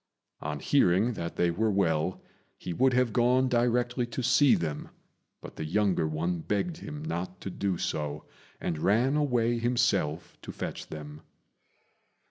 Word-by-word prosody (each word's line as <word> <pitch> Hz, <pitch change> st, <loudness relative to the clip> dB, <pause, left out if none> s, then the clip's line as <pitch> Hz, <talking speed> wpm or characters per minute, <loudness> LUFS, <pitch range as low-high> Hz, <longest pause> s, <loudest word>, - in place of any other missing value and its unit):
On -, -, -4 dB
hearing 100 Hz, +8 st, +3 dB
that 85 Hz, -5 st, -5 dB
they 85 Hz, -1 st, +2 dB
were 110 Hz, +6 st, +1 dB
well, 90 Hz, -3 st, 0 dB, 0.3 s
he 90 Hz, -, -5 dB
would 130 Hz, +8 st, +3 dB
have 125 Hz, -3 st, +2 dB
gone 125 Hz, +3 st, +3 dB
directly 120 Hz, 0 st, +1 dB
to 120 Hz, +2 st, -4 dB
see 125 Hz, +3 st, +5 dB
them; 75 Hz, -3 st, -3 dB, 0.5 s
but -, -, -11 dB
the -, -, -3 dB
younger 90 Hz, 0 st, +1 dB
one 85 Hz, +3 st, -1 dB
begged 105 Hz, -, -2 dB
him 150 Hz, -2 st, -7 dB
not 90 Hz, -, -4 dB
to 95 Hz, -, -5 dB
do 95 Hz, -1 st, -1 dB
so, 75 Hz, -5 st, -3 dB, 0.3 s
and 80 Hz, -, -3 dB
ran 120 Hz, -, +2 dB
away 120 Hz, -5 st, +1 dB
himself 110 Hz, -10 st, 0 dB
to -, -, -7 dB
fetch -, -, -6 dB
them. 75 Hz, -1 st, -8 dB
105 Hz, 150 wpm, -28 LUFS, 85-125 Hz, 0.5 s, see